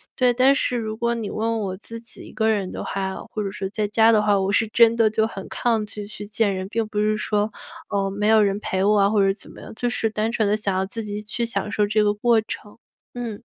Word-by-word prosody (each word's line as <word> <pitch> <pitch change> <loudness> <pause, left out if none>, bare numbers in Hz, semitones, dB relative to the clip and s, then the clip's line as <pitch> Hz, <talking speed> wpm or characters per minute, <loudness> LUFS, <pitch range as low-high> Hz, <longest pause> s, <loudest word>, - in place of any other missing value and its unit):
对， 250 -1 +3
但 255 +3 +5
是 250 -2 0
如 220 -2 -3
果 235 +1 0
你 225 -3 -4
问 225 +1 -1
我 190 -2 -3
自 230 +4 -9
己 230 - -15
一 - - -12
个 220 0 0
人 200 -4 0
的 - - -5
话， 190 -1 -3 0.2
或 215 - -3
者 195 - -2
是 195 -1 -4
在 210 0 -1
家 225 +2 +4
的 215 - +4
话， 205 -1 +3
我 190 +1 0
是 220 +2 +2
真 230 +1 +5
得 225 -2 +4
就 220 +1 +1
很 195 -4 -8
抗 230 -3 0
拒 205 -1 -7
去 210 0 -8
见 210 -1 +1
人， 185 0 -4
并 225 0 -1
不 210 -1 -3
是 215 0 +2
说， 210 0 0 0.4
呃， 195 -1 0
没 205 +1 -1
有 220 0 +6
人 200 -1 +1
陪 190 -2 -1
我 210 +1 +4
啊， 200 - +4
或 210 -1 +2
者 195 - +3
怎 200 - -14
么 - - -13
样， - - -10
就 245 +2 -1
是 225 -2 +1
单 220 +1 -1
纯 220 -3 +1
地 210 - +2
想 205 -3 -2
要 190 - 0
自 225 +4 -6
己 210 0 -5
去 235 +3 -3
享 230 -2 -2
受 210 - +2
这 215 0 +2
个 205 0 +2
过 230 +2 +3
程。 210 -1 -8 0.4
嗯。 235 -4 -5
215 Hz, 290 characters per minute, -23 LUFS, 205-225 Hz, 0.4 s, 有